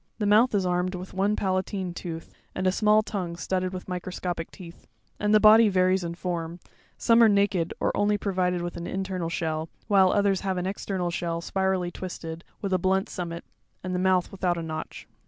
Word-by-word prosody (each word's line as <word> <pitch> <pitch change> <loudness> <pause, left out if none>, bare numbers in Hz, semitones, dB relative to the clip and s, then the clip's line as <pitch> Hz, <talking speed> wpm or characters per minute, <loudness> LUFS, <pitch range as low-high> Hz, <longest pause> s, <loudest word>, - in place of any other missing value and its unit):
'The 210 - -1
mouth 215 +3 +4
is 195 -2 +1
armed 180 +1 0
with 180 +1 -8
one 200 +3 +1
palatine 185 -1 -2
tooth, 165 -2 -7 0.2
and 185 - -2
a 185 - +4
small 215 +2 +3
tongue 185 -6 -4
studded 185 +1 -2
with 185 -1 -7
microscopic 180 -2 -4
teeth; 170 -4 -13 0.3
and 210 0 +1
the 215 - +6
body 215 +1 +7
varies 185 -1 +2
in 170 0 -4
form; 170 -1 -4 0.4
some 230 0 +4
are 225 - +7
naked 200 -4 +2
or - - 0
only 205 0 +2
provided 180 -3 -1
with 175 - -4
an 170 - -5
internal 190 -3 -3
shell, 160 -2 -2 0.2
while 195 -3 +5
others 200 -2 +2
have 190 -2 -1
an 180 - -2
external 190 -2 -2
shell 170 -1 -2
spirally 190 0 -1
twisted, 170 -2 -7 0.2
with 195 -1 -1
a 185 - +3
blunt 190 +2 +1
summit, 170 -1 -5 0.4
and 185 0 -3
the 180 - 0
mouth 185 -1 +2
without 180 -2 -1
a 165 - -3
notch. 160 -1 -6
185 Hz, 195 wpm, -26 LUFS, 175-195 Hz, 0.4 s, body